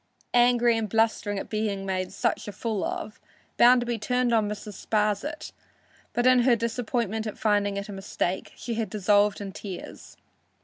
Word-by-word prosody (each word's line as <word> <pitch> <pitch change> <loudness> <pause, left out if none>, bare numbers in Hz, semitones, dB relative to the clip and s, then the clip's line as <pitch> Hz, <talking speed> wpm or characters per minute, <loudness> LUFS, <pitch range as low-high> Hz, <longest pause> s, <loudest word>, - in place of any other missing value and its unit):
Angry 240 -1 +4
and 215 -2 -3
blustering 220 -2 +1
at - - -4
being 210 -3 -2
made 185 -1 -2
such 195 - -1
a - - -4
fool 210 0 -3
of, 210 - -4 0.4
Bounderby 240 -1 +5
turned 250 +2 +1
on 215 -2 +2
Mrs. 210 0 -6
Sparsit, 215 +8 -1 0.6
but 240 - 0
in 255 0 +6
her 240 0 +4
disappointment 230 -1 -2
at 215 - -6
finding 205 -2 +1
it 200 - -4
a - - -7
mistake, 195 -1 -3
she 235 - -5
had 225 -1 -2
dissolved 205 0 +2
in 200 -1 -6
tears. 190 -2 -9
215 Hz, 165 wpm, -26 LUFS, 205-235 Hz, 0.6 s, in